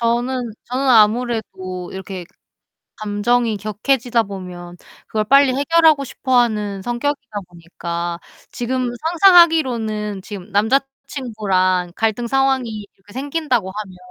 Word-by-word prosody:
저는 240 +1 -1
저는 260 +2 -2
아무래도 215 -6 +1
이렇게 190 -1 -7 0.7
감정이 215 +2 0
격해지다 230 +4 0
보면 180 -3 -8 0.3
그걸 215 -1 -1
빨리 275 +2 +5
해결하고 310 +1 +4
싶어하는 220 -7 0
성격이다 245 -1 -3
보니까 170 0 -5 0.3
지금 250 +1 -2 0.2
상상하기로는 265 - +4
지금 200 0 -9
남자친구랑 210 -6 0
갈등 225 +2 0
상황이 260 -5 0
이렇게 200 +2 -19
생긴다고 265 - -1
하면 195 -2 -7
225 Hz, 290 characters per minute, -19 LUFS, 200-260 Hz, 0.7 s, 빨리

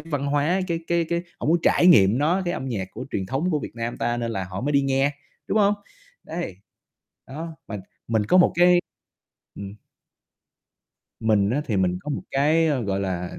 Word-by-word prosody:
văn 145 -4 -3
hóa, 145 +6 +1
cái 165 -1 0
cái 170 -1 +1
cái 170 0 -1 0.2
họ - - -3
muốn 170 +2 +4
trải 175 - +4
nghiệm 110 - +6
nó, 170 +7 +2
cái 175 - -1
âm 130 - -4
nhạc 100 -7 -3
của 130 - -7
truyền 95 -2 -2
thống 140 - -1
của 155 - +1
Việt - - -7
Nam 115 0 -4
ta 120 0 -1
nên 115 -1 -2
là 95 -4 -3
họ 95 - -4
mới 145 +3 -1
đi 140 - +4
nghe, 135 +1 +2 0.4
đúng 215 - +1
hông? 205 0 +4 0.5
Đấy, 165 - -5 0.7
đó, 160 +4 -7
mà 105 - -4 0.3
mình 110 -2 +1
có 180 - +4
một 180 - +5
cái 175 0 +5 0.7
ừm. 100 0 -8 1.5
Mình 105 -2 +2
á 140 - +1
thì 110 -9 -1
mình 90 -1 +1
có 150 - -6
một - - -3
cái, 155 +4 +3
ơ, 140 -6 0
gọi 100 -1 -1
là, 90 -2 -4
135 Hz, 205 wpm, -24 LUFS, 105-165 Hz, 1.5 s, nghiệm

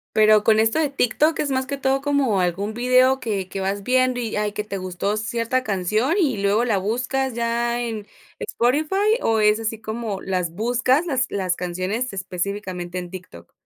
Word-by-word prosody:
Pero 215 -1 +5
con 220 0 +4
esto 225 +6 +2
de 300 -3 +1
TikTok 280 +4 +1
es, 285 - 0
más 260 0 -1
que 280 0 -3
todo, 270 0 +1
como 275 -8 +1
algún 195 +5 -1
video 255 +2 +3
que 205 -7 -3
que 195 - -5
vas 195 +1 -2
viendo 255 +1 +2
y, 230 -3 -3
ay, 210 0 0
que 210 - -3
te 200 -2 -5
gustó 185 +2 -2
cierta 230 +3 -1
canción 215 - 0
y 265 - +1
luego 205 +4 +2
la 220 -5 +1
buscas 250 +5 -1
ya 235 0 0
en 220 -3 -4 0.3
Spotify 290 +9 0 0.3
o, 225 -1 +2
¿es 210 +1 +4
así 225 0 -3
como 220 -2 -4
las 180 -3 -2
buscas, 245 - +1
las 260 -5 0
las 185 -3 -1
canciones 185 +7 -3
específicamente 185 -1 -4
en 180 0 -6
TikTok? 170 - -11
220 Hz, 185 wpm, -22 LUFS, 195-255 Hz, 0.3 s, Pero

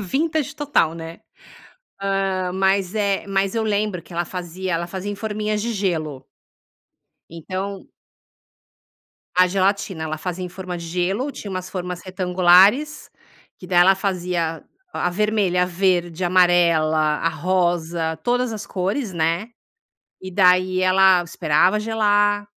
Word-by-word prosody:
vintage 300 - -1
total, 285 - +1
né? 165 0 -9 0.8
Ah, 195 -2 -1
mas 190 0 +1
é 200 -2 0
mas 195 0 0
eu 225 - 0
lembro 210 -3 -1
que 175 - -16
ela 175 +1 -1
fazia 180 +1 -5
ela 170 +1 -1
fazia 190 +3 -5
em - - -4
forminhas 210 0 -3
de 235 +2 -2
gelo. 160 -9 -2 1.1
Então 185 +4 -6 1.5
a 185 0 +5
gelatina. 190 -2 -1
Ela 155 0 -4
fazia 180 +2 -4
em 180 - -5
forma 180 0 -7
de 170 -1 -8
gelo 185 - -1
tinha 205 - -8
umas 185 -1 -5
formas 180 -1 -5
retangulares, 185 +9 +3 0.5
que 185 - -11
daí 180 -1 +2
ela 190 +2 +6
fazia 180 -4 -2 0.3
a - - -1
vermelha, 200 -2 +1
a - - +1
verde, 175 -1 0
amarela, 175 -3 +3
a 155 +1 +1
rosa, 170 -2 -1
todas 245 0 0
as 215 -2 -6
cores, 195 +4 -2
né, 170 +6 0 0.7
e 185 0 -8
daí 185 -1 +4
ela 185 -1 +5
esperava 170 +3 +1
gelar 205 -1 +1
185 Hz, 135 wpm, -21 LUFS, 175-200 Hz, 1.5 s, ela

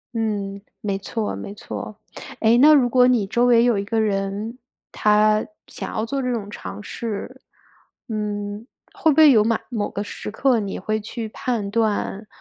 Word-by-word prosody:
嗯， 200 -3 -2 0.2
没 200 -2 -1
错 215 +2 -3
没 200 - -7
错。 210 0 -7 0.4
诶， 225 +1 +4
那 300 +4 +8
如 270 -5 +5
果 250 +1 +5
你 240 -5 +3
周 235 +5 +1
围 235 -1 +5
有 240 -3 +3
一 - - -2
个 220 +2 -1
人， 205 +3 -2 0.3
他 215 0 +3 0.2
想 - - -7
要 220 - -1
做 275 +3 -2
这 250 -1 -1
种 210 -4 -3
尝 210 - -7
试， 215 -1 -6 0.7
嗯， 210 -1 -4 0.3
会 320 - +2
不 295 - -1
会 310 -3 +8
有 215 -4 +5
马 225 0 +1
某 220 -5 -2
个 205 - -4
时 205 - -7
刻 245 +3 +2
你 200 -2 -4
会 215 +3 -2
去 220 +2 -5
判 220 -2 -3
断， 215 -1 -1
215 Hz, 190 characters per minute, -22 LUFS, 205-235 Hz, 0.7 s, 那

